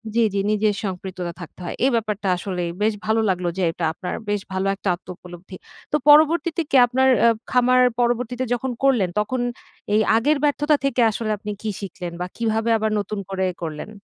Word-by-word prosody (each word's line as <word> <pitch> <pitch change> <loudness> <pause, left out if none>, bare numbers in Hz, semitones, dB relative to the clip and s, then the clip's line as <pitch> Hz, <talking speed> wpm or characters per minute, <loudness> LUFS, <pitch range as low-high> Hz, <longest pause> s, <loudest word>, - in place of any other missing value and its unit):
জি, - - +3
জি। 200 - 0
নিজের 215 0 +2
সম্পৃক্ততা 185 -2 -5
থাকতে 175 - -11
হয়। - - -4
এই - - +5
ব্যাপারটা 210 -3 -2
আসলেই 180 -2 -3
বেশ 215 +1 +2
ভালো 220 +1 +2
লাগলো 180 -1 -1
যে - - -1
এটা 170 - -7
আপনার 180 +2 -5
বেশ 205 -1 0
ভালো 190 +1 -1
একটা 195 - -3
আত্মউপলব্ধি। 180 +1 -11 0.4
তো - - +2
পরবর্তীতে 315 +2 +5
কি - - 0
আপনার 260 +2 +2 0.2
আ - - +7 0.2
খামার 255 0 +4 0.2
পরবর্তীতে 245 +1 0
যখন 250 +1 -2
করলেন 235 -10 +3
তখন 240 +4 -1 0.5
এই 215 - +4
আগের 285 +7 +2
ব্যর্থতা 295 +1 +2
থেকে 260 -2 +1
আসলে 215 0 -3
আপনি 210 0 -6
কি 220 - -3
শিখলেন 180 -3 -6
বা - - -1
কীভাবে 225 0 0
আবার 220 0 -1
নতুন 205 +1 -4
করে 190 -1 -1 0.2
করলেন? 155 +3 -5
215 Hz, 185 wpm, -22 LUFS, 190-250 Hz, 0.5 s, আ